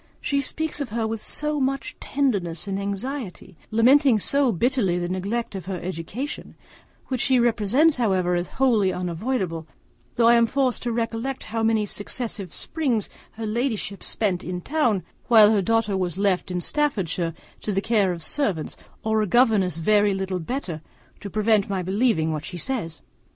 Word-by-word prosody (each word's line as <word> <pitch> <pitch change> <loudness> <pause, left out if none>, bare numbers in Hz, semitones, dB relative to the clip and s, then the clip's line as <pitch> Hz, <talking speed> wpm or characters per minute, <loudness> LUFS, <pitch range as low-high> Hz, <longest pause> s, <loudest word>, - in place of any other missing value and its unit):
She 280 -1 0
speaks 315 +2 -2
of 275 - -3
her 225 +1 -1
with 220 -1 -3
so 300 0 -1
much 275 0 -1
tenderness 200 - -1
and 195 0 -2
anxiety, 200 0 -5
lamenting 255 +3 +5
so 275 +4 +2
bitterly 220 -3 +1
the 175 0 -2
neglect 205 +6 -2
of 190 -3 -6
her 190 -2 -3
education, 185 - -5 0.5
which 255 -2 -1
she 260 -2 +4
represents 240 +7 +3
however 190 -7 +1
as 175 0 0
wholly 225 -8 +3
unavoidable, 180 -2 -2 0.5
that 235 - +2
I 230 +1 +7
am 235 -1 +5
forced 260 0 +1
to 240 - -2
recollect 230 +3 -2
how 225 +1 -3
many 220 -1 +2
successive 205 -2 -4
springs 260 - -1 0.2
her 225 0 -5
ladyship 220 -3 -2
spent 190 -5 -1
in 180 0 -4
town, 240 - +1 0.2
while 220 -3 +7
her 210 -2 +3
daughter 225 0 +1
was 180 -2 -1
left 195 -3 +1
in 180 -1 -2
Staffordshire 180 - -1 0.2
to 210 - -3
the 195 - +1
care 205 -3 +2
of 170 -2 -5
servants, 195 - -1 0.3
or 220 0 +1
a 210 - 0
governess 205 - +3
very 205 +3 +3
little 190 -1 -2
better, 175 - -4 0.4
to 200 - -7
prevent 215 0 +2
my 190 -2 -1
believing 190 -4 +1
what 150 -1 -4
she 180 - -7
says. 165 - -4
215 Hz, 165 wpm, -24 LUFS, 185-245 Hz, 0.5 s, I